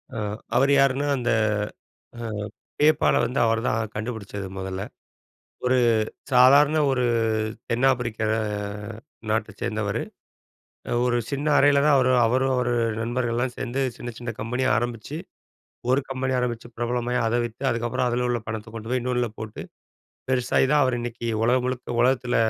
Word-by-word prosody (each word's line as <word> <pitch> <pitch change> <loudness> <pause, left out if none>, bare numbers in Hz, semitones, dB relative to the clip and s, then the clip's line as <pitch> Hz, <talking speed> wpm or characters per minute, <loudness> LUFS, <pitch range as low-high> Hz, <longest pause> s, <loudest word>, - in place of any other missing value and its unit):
ஆ - - -4 0.4
அவர் 140 +1 +4
யாருன்னா 140 +1 +2
அந்த, 120 -1 0 0.9
ஆ - - -5 0.6
Paypalல 155 0 +4
வந்து 125 +3 -2
அவர்தான் 115 0 +1 0.2
கண்டுபிடிச்சது 105 -3 -5
மொதல்ல. 95 0 -4 0.8
ஒரு 125 0 +3 0.5
சாதாரண 140 +5 +6
ஒரு 130 -2 +1 0.7
தென் 120 +3 +2
ஆப்பிரிக்க 120 -4 -2 1.1
நாட்டச் 105 -1 -2
சேர்ந்தவரு. 110 -4 -1 1.0
ஒரு 120 -1 +2
சின்ன 140 +2 -2
அறையில 140 0 +5
தான் 150 - +5
அவரு 130 -1 +3
அவரும், 130 +3 +2
அவர் 125 -1 0 0.3
நண்பர்கள்லாம் 120 +1 -1
சேர்ந்து 130 +2 -2 0.2
சின்ன 120 - -6
சின்ன 120 - -5
கம்பெனிய 125 +2 -1
ஆரம்பிச்சு, 120 +5 -3 0.7
1 130 - +4
கம்பெனி 130 0 -1
ஆரம்பிச்சு 120 -1 -3
பிரபலமாய் 120 0 -1
அத 115 - 0
வித்து 120 +2 -7
அதுக்கப்புறம் 120 +1 -1
அதில 125 +1 0
உள்ள 120 -1 +1
பணத்த 110 0 -5
கொண்டு 115 0 -7
போய் 130 0 +1
இன்னொன்னுல 125 -2 0
போட்டு 110 -1 -6 0.7
பெருசாகி 130 0 +2
தான், 150 -1 +5
அவரு 130 -2 +1
இன்னைக்கி 120 0 -5 0.2
உலகம் 125 +2 +2
முழுக்க 125 -2 -3
உலகத்தில 125 0 +2
125 Hz, 135 wpm, -24 LUFS, 115-130 Hz, 1.1 s, சாதாரண